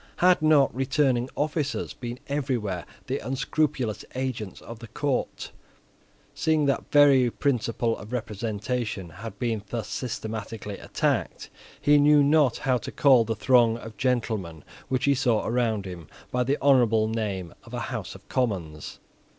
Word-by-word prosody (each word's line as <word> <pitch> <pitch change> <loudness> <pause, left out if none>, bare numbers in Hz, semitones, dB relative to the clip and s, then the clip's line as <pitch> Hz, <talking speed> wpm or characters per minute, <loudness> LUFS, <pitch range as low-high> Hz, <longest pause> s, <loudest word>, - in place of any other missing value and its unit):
Had 180 -1 +4
not 155 -3 +4
returning 130 -1 +1
officers 150 -1 -2
been 120 0 -6
everywhere 125 - -2 0.2
the - - -2
unscrupulous 130 -2 -1
agents 125 -6 -4
of 115 -1 -10
the 115 - -10
Court? 140 +4 -2 0.8
Seeing 155 -2 +1
that 140 -1 -1
the - - +1
very 135 -4 +6
principle 115 -3 0
of 105 - -10
representation 110 -3 -3
had 100 +8 -9
been 115 -4 -1
thus 115 -2 -3
systematically 110 -3 -5
attacked, - - -2 0.3
he 145 0 +5
knew 145 0 +6
not 145 -4 +4
how 130 -2 +1
to - - -7
call 130 -5 +5
the 115 0 -2
throng 120 0 +4
of 115 -1 -10
gentlemen 110 - -1 0.3
which 130 -1 0
he 140 - +4
saw 125 -5 +1
around 110 -4 0
him 90 -4 -8 0.2
by 125 0 +1
the 140 +3 +1
honourable 120 -6 +4
name 100 -6 -3
of - - -14
a - - -2
House - - -5
of - - -15
Commons. 90 - -2
120 Hz, 150 wpm, -26 LUFS, 110-135 Hz, 0.8 s, very